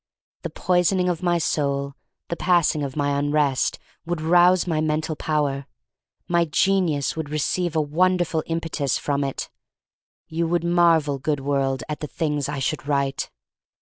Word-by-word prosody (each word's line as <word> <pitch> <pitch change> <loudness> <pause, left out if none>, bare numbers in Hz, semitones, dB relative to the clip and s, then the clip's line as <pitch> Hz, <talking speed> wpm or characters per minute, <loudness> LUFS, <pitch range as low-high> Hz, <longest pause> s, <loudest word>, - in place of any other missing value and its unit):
The - - -4
poisoning 180 0 +1
of 175 -1 -2
my 175 -1 +2
soul 140 -3 -1 0.2
— - - -58
the 170 - -1
pass 175 -2 +3
ing 150 - -3
of 140 -2 -4
my 145 -1 0
unrest 145 -2 +1
— - - -37
would 175 -1 -2
rouse 175 +3 +4
my 160 -3 0
mental 155 +1 -1
power. 145 -3 -1 0.6
My 170 -1 +2
genius 165 -3 +1
would 160 -2 -4
re 155 - -2
ceive 175 +3 -1
a 155 - +3
wonderful 175 +2 +1
impetus 165 -4 -1
from 145 -1 -1
it. 135 -1 -4 0.8
You 165 +1 -1
would 170 0 0
marvel, 165 -5 +3
good 145 +1 -1
world, 135 -1 0
at 150 - -4
the 150 - -4
things 150 -1 -2
I 145 - -3
should 135 +1 -2
write. 140 -1 -1
155 Hz, 170 wpm, -23 LUFS, 145-170 Hz, 0.8 s, rouse